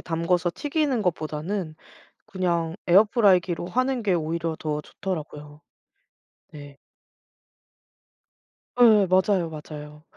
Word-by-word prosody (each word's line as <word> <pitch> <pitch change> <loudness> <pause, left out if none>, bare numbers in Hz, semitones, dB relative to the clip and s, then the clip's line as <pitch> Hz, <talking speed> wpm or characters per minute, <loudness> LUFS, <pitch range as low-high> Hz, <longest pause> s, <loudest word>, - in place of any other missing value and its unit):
담가서 170 +1 -1
튀기는 290 -5 -1
것보다는 160 0 -3 0.5
그냥 170 -3 -2
에어프라이기로 190 -3 +3
하는 255 +1 -1
게 200 -3 +1
오히려 165 0 -2
더 150 -1 -3
좋더라고요. 150 -5 -7 0.9
네. 145 -2 -11 2.0
예예. 215 -5 +6
맞아요, 185 -1 +2
맞아요. 150 -1 -10
175 Hz, 235 characters per minute, -24 LUFS, 155-200 Hz, 2.0 s, 예예